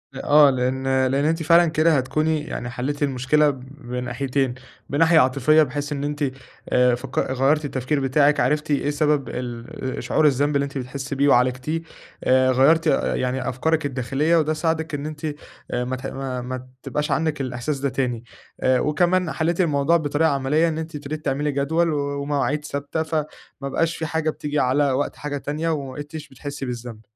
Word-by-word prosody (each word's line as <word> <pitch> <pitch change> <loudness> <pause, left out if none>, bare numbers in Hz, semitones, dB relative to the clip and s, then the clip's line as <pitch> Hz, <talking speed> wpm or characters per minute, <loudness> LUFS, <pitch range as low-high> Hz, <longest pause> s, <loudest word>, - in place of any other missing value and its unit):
أ 135 - -6
آه 145 0 +6
لإن 130 0 -1 0.2
لإن 135 +3 +1
أنتِ 160 +1 +1
فعلًا 170 +2 +6
كده 160 0 +3
هتكوني 155 +4 0
يعني 120 -5 -5
حلّيتِ 140 +4 -3
المشكلة 140 +2 +2
بناحيتين، 125 0 -3 0.4
بناحية 160 +3 +4
عاطفية 140 +4 +4
بحيث 145 +1 -4
إن 140 -1 -3
أنتِ 145 0 -2 0.5
آآ 125 -1 +4
فك 125 +3 -9
غيّرتِ 135 +4 +1
التفكير 135 +1 -1
بتاعِك 140 +2 +3
عرفتِ 150 +4 +1
إيه 145 0 +1
سبب 150 -1 +1
ال 125 +1 -5
شعور 155 - +2
الذنب 145 +1 +1
اللي 140 - +2
أنتِ 140 0 -6
بتحسّي 135 +2 -5
بيه 140 +1 +2
وعالجتيه، 130 +5 +2 0.4
آآ 130 0 +4
غيّرتِ 155 +6 +4
يعني 130 -3 0
أفكارِك 155 +5 0
الداخلية 135 +4 0
وده 155 -1 +2
ساعدِك 160 0 -1
إن 145 0 -3
أنتِ 155 0 -6 0.5
آآ 125 - -1
ما 130 +1 -2
تح 130 - -8
ما 130 -2 -4
ما 130 +1 -6 0.2
تبقاش 150 0 -2
عندِك 155 -3 0
الإحساس 130 +2 -3
ده 140 +1 0
تاني، 125 -3 -2 0.4
آآ 130 -1 +3
وكمان 175 +4 +1
حلّيتِ 170 +3 0
الموضوع 155 0 +3
بطريقة 155 0 +1
عملية 140 +4 +2
إن 160 -1 -2
أنتِ 160 0 -5
ابتديتِ 150 +1 -6
تعملي 145 +1 0
جدول 160 +5 +1
ومواعيد 145 0 -1
ثابتة، 145 +2 -3
فما 160 -1 -1 0.4
بقاش 165 +4 -1
في 160 - -3
حاجة 160 0 -1
بتيجي 150 -1 -2
على 140 +2 +2
وقت 135 +2 -1
حاجة 145 -1 -4
تانية، 150 +4 -3
وما 140 -5 -3
بقيتيش 150 +2 -8
بتحسّي 140 +1 -6
بالذنب. 120 -3 -6
145 Hz, 170 wpm, -23 LUFS, 130-155 Hz, 0.5 s, آه